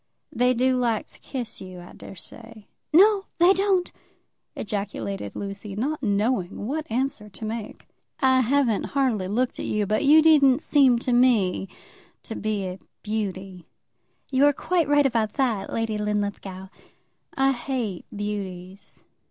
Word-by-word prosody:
"They 250 Hz, -1 st, +2 dB
do 255 Hz, +2 st, +2 dB
like 230 Hz, -3 st, 0 dB
to -, -, -12 dB
kiss 245 Hz, -5 st, -5 dB
you, 185 Hz, -1 st, -9 dB
I 175 Hz, -, -12 dB
daresay." 220 Hz, +3 st, -10 dB, 0.3 s
"No, 395 Hz, +4 st, +5 dB
they 350 Hz, +3 st, +6 dB
don't," 385 Hz, -2 st, +1 dB, 0.6 s
ejaculated 110 Hz, -, -4 dB
Lucy, 200 Hz, 0 st, -6 dB
not 280 Hz, +8 st, -2 dB
knowing 205 Hz, -3 st, 0 dB
what 305 Hz, +6 st, -3 dB
answer 245 Hz, -2 st, -2 dB
to 210 Hz, +3 st, -9 dB
make. 220 Hz, 0 st, -6 dB, 0.3 s
"I 260 Hz, -1 st, +4 dB
haven't 255 Hz, -3 st, +1 dB
hardly 235 Hz, -9 st, +1 dB
looked 240 Hz, +6 st, -1 dB
at -, -, -4 dB
you, 210 Hz, -1 st, 0 dB
but 215 Hz, +6 st, 0 dB
you 305 Hz, +2 st, +7 dB
didn't 280 Hz, -5 st, +6 dB
seem 275 Hz, -6 st, +4 dB
to 245 Hz, +1 st, -1 dB
me 230 Hz, -7 st, +3 dB, 0.6 s
to 225 Hz, -, -6 dB
be 210 Hz, -2 st, -2 dB
a 185 Hz, +1 st, -6 dB, 0.2 s
beauty." 195 Hz, -4 st, -4 dB, 0.6 s
"You're 280 Hz, +2 st, +4 dB
quite 345 Hz, +1 st, 0 dB
right 290 Hz, 0 st, +4 dB
about 230 Hz, -5 st, +1 dB
that, 230 Hz, -8 st, -1 dB
Lady 225 Hz, -2 st, -2 dB
Linlithgow." 200 Hz, -2 st, -3 dB, 0.7 s
"I 270 Hz, 0 st, +3 dB
hate 240 Hz, -7 st, -3 dB
beauties. 200 Hz, -2 st, -6 dB
225 Hz, 140 wpm, -24 LUFS, 200-270 Hz, 0.7 s, you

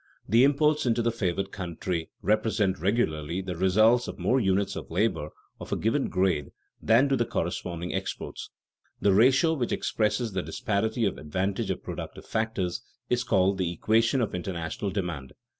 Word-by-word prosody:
The 115 Hz, +5 st, +5 dB
imports 150 Hz, +1 st, +3 dB
into 120 Hz, 0 st, +2 dB
the 115 Hz, -, +2 dB
favored 95 Hz, -3 st, -2 dB
country 85 Hz, -2 st, -4 dB
represent 105 Hz, -2 st, +1 dB
regularly 85 Hz, -5 st, 0 dB
the 90 Hz, -1 st, -4 dB
results 110 Hz, +7 st, +4 dB
of -, -, -6 dB
more 130 Hz, -, +2 dB
units 95 Hz, -2 st, +1 dB
of -, -, -7 dB
labor 85 Hz, -4 st, 0 dB, 0.3 s
of -, -, -9 dB
a -, -, +2 dB
given 115 Hz, +7 st, 0 dB
grade 90 Hz, -6 st, +1 dB, 0.3 s
than 115 Hz, +5 st, +4 dB
do 135 Hz, -, +2 dB
the 120 Hz, -, +2 dB
corresponding 85 Hz, -3 st, -3 dB
exports. 95 Hz, 0 st, -5 dB, 0.5 s
The 100 Hz, -, +3 dB
ratio 130 Hz, -, +5 dB
which 130 Hz, -7 st, -2 dB
expresses 110 Hz, +1 st, 0 dB
the 95 Hz, -, 0 dB
disparity 110 Hz, +5 st, -1 dB
of 100 Hz, -, -1 dB
advantage 95 Hz, +6 st, -2 dB
of -, -, -3 dB
productive -, -, -7 dB
factors 105 Hz, -5 st, -2 dB, 0.3 s
is 120 Hz, 0 st, +2 dB
called 95 Hz, -3 st, +2 dB
"the 90 Hz, -2 st, 0 dB
equation 115 Hz, -, +2 dB
of 115 Hz, -, -1 dB
international 90 Hz, +1 st, -3 dB
demand." 85 Hz, -9 st, -4 dB
100 Hz, 160 wpm, -27 LUFS, 90-115 Hz, 0.5 s, The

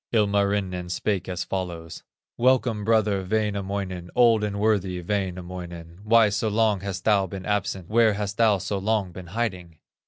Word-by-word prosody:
Ilmarinen 100 Hz, -4 st, +1 dB
spake 95 Hz, 0 st, -2 dB
as 90 Hz, -1 st, -2 dB
follows: 85 Hz, -4 st, -5 dB, 0.3 s
"Welcome, 120 Hz, -3 st, +2 dB
brother 105 Hz, -3 st, +2 dB
Wainamoinen, 100 Hz, -3 st, -2 dB
Old 115 Hz, -3 st, +5 dB
and 100 Hz, -1 st, -2 dB
worthy 100 Hz, -4 st, +1 dB
Wainamoinen! 90 Hz, -3 st, -5 dB
Why 110 Hz, 0 st, +5 dB
so 105 Hz, +2 st, -1 dB
long 105 Hz, -1 st, +2 dB
hast 95 Hz, -1 st, -5 dB
thou 100 Hz, -3 st, +3 dB
been 95 Hz, 0 st, -7 dB
absent, 100 Hz, -3 st, -2 dB
Where 110 Hz, 0 st, +4 dB
hast 100 Hz, 0 st, -4 dB
thou 110 Hz, -3 st, +4 dB
so 95 Hz, +2 st, -3 dB
long 100 Hz, -2 st, 0 dB
been 90 Hz, 0 st, -10 dB
hiding?" 90 Hz, -5 st, -4 dB
100 Hz, 150 wpm, -25 LUFS, 90-105 Hz, 0.3 s, Old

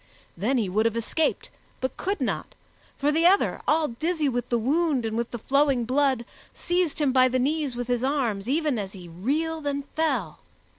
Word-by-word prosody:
Then 235 Hz, +9 st, 0 dB
he 220 Hz, -5 st, +1 dB
would 215 Hz, +5 st, +2 dB
have 230 Hz, -, -2 dB
escaped, 300 Hz, +7 st, -1 dB, 0.3 s
but 260 Hz, -, -3 dB
could 400 Hz, +2 st, -2 dB
not, -, -, -2 dB, 0.4 s
for 290 Hz, +2 st, +1 dB
the 325 Hz, +3 st, +4 dB
other, 390 Hz, +2 st, +3 dB
all 310 Hz, 0 st, +3 dB
dizzy 310 Hz, +5 st, -1 dB
with 245 Hz, -3 st, -2 dB
the 240 Hz, -, +2 dB
wound 280 Hz, +1 st, +1 dB
and 220 Hz, 0 st, -2 dB
with 235 Hz, 0 st, -1 dB
the 240 Hz, -, -5 dB
flowing 270 Hz, 0 st, +2 dB
blood, 260 Hz, -1 st, +1 dB, 0.3 s
seized 350 Hz, -3 st, 0 dB
him 295 Hz, -3 st, +2 dB
by 255 Hz, 0 st, +5 dB
the 255 Hz, 0 st, 0 dB
knees 285 Hz, 0 st, 0 dB
with 245 Hz, 0 st, -4 dB
his 245 Hz, -1 st, 0 dB
arms 245 Hz, -7 st, 0 dB
even 295 Hz, -4 st, +1 dB
as 195 Hz, -2 st, -5 dB
he 180 Hz, -3 st, -10 dB
reeled 295 Hz, -, -2 dB
and 280 Hz, 0 st, -2 dB
fell. 265 Hz, -, -1 dB
265 Hz, 195 wpm, -26 LUFS, 235-305 Hz, 0.4 s, by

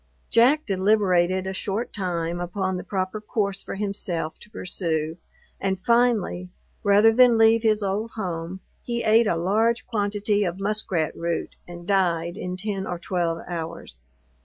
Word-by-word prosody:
Jack 265 Hz, +7 st, +4 dB
deliberated 190 Hz, -2 st, +2 dB
a 190 Hz, -, -3 dB
short 200 Hz, +4 st, -3 dB
time 175 Hz, -3 st, -2 dB
upon 185 Hz, +2 st, -2 dB
the 180 Hz, -, -4 dB
proper 190 Hz, +2 st, -3 dB
course 200 Hz, -3 st, -1 dB
for -, -, -6 dB
himself 195 Hz, -5 st, -3 dB
to -, -, -14 dB
pursue, 160 Hz, -5 st, -3 dB, 0.4 s
and 190 Hz, -1 st, -1 dB
finally, 230 Hz, -5 st, +1 dB, 0.3 s
rather 205 Hz, +2 st, +5 dB
than 245 Hz, -1 st, +6 dB
leave 225 Hz, 0 st, +5 dB
his 215 Hz, -2 st, +2 dB
old 200 Hz, +3 st, -1 dB
home, 180 Hz, -2 st, -4 dB, 0.2 s
he 235 Hz, -1 st, -3 dB
ate 220 Hz, +1 st, +5 dB
a 170 Hz, -, +2 dB
large 220 Hz, +7 st, +1 dB
quantity 205 Hz, -2 st, 0 dB
of 180 Hz, 0 st, -3 dB
muskrat 195 Hz, -5 st, -1 dB
root, 170 Hz, 0 st, -3 dB
and 175 Hz, 0 st, -9 dB
died 175 Hz, -3 st, +1 dB
in 180 Hz, 0 st, -5 dB
10 195 Hz, 0 st, -3 dB
or 175 Hz, -, -3 dB
12 170 Hz, -2 st, -2 dB
hours. 165 Hz, -, -6 dB
195 Hz, 150 wpm, -24 LUFS, 175-215 Hz, 0.4 s, than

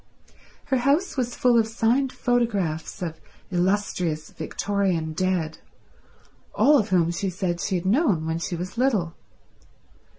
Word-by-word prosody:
Her 270 Hz, -2 st, +1 dB
house 280 Hz, +9 st, +1 dB
was 245 Hz, -3 st, -2 dB
full 245 Hz, -2 st, +4 dB
of 220 Hz, -, +2 dB
signed 240 Hz, +4 st, +1 dB
photographs 205 Hz, -11 st, -1 dB
of 160 Hz, -2 st, -5 dB, 0.3 s
illustrious 180 Hz, -4 st, 0 dB
Victorian 175 Hz, -1 st, -1 dB
dead, 170 Hz, -2 st, -1 dB, 1.0 s
all 290 Hz, 0 st, +5 dB
of 215 Hz, -1 st, -1 dB
whom 170 Hz, -3 st, +3 dB
she 190 Hz, +3 st, -2 dB
said 180 Hz, -2 st, -2 dB
she 190 Hz, -, -1 dB
had 175 Hz, 0 st, -2 dB
known 200 Hz, -, +2 dB
when 160 Hz, +1 st, -1 dB
she 175 Hz, +1 st, -3 dB
was 185 Hz, +7 st, -6 dB
little. 210 Hz, -11 st, +1 dB
190 Hz, 135 wpm, -24 LUFS, 170-240 Hz, 1.0 s, all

